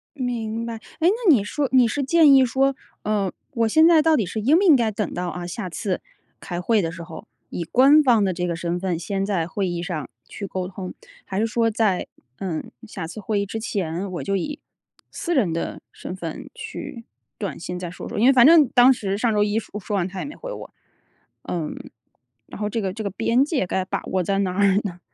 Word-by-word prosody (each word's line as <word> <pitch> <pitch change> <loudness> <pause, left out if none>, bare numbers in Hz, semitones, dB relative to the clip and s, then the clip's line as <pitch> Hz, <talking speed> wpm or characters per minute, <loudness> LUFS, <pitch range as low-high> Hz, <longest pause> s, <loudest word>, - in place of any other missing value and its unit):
明 230 -4 -3
白， 230 -1 -4
哎， 225 - -10 0.2
那 340 - +5 0.2
你 210 -6 +3
说 275 +6 -2
你 255 -3 +5
是 280 +6 -1
建 300 0 +6
议 265 -1 +7
说， 270 +3 +1 0.3
呃， 205 -3 0 0.2
我 230 -3 +1
现 315 +8 +5
在 330 -2 +6
到 320 0 +4
底 225 - +1
是 185 +5 -4
应 280 +10 +4
不 390 - +2
应 340 -7 +7
该 230 -4 +1
等 210 -3 -3
到， 180 0 -3
啊， 175 +1 -5
下 185 +1 -5
次 185 +2 -3 0.4
开 175 0 -5
会 215 +3 +2
的 165 - -2
时 170 0 -8
候， 165 -1 -10 0.2
以 175 - -4
官 270 - +6
方 240 -7 +4
的 190 -2 +1
这 180 +1 -2
个 170 - -1
身 170 +1 -2
份 180 -3 -1
先 195 +3 -2
在 180 -5 -1
会 195 +2 -2
议 175 -1 -3
上 155 -7 -4 0.2
去 200 - -7
沟 185 -1 -3
通， 185 0 -7 0.3
还 190 - -3
是 225 - +2
说 230 0 +1
在， 210 -4 0 0.3
呃， 175 -5 -3 0.2
下 195 -6 -6
次 175 +6 -8
会 205 -1 -1
议 200 - -1
之 225 +3 -5
前， 190 -3 -3
我 175 - -4
就 195 0 -1
以 295 +11 -3 0.5
私 345 -4 -2
人 200 -11 +2
的 165 - -4
身 180 - -7
份 165 -4 -7
去 230 - -7 0.3
短 195 -8 -4
信 180 +1 -5
再 180 -1 -5
说 180 - -8
说。 - - -6
因 220 - +3
为 270 - +7
反 245 -1 +7
正 320 -4 +7
当 250 0 +6
时 200 -6 -1
上 225 +1 +1
周 210 0 +3
一 210 +2 +1
说 210 - -8
说 205 +1 -4
完 185 -2 0
他 190 0 -7
也 - - -4
没 290 - -8
回 - - -7
我， - - -9 0.7
呃， 160 -4 -3 0.8
然 - - -10
后 210 - 0
这 225 +1 -1
个 190 -2 -2
这 220 +3 -6
个 200 - -2
边 230 +6 +2
界 290 - -1
该 185 +1 -1
把 - - -3
握 185 -1 -1
在 195 +3 0
哪 190 -2 0
儿 200 -2 +4
呢？ 180 -3 -5
205 Hz, 255 characters per minute, -23 LUFS, 180-245 Hz, 0.8 s, 议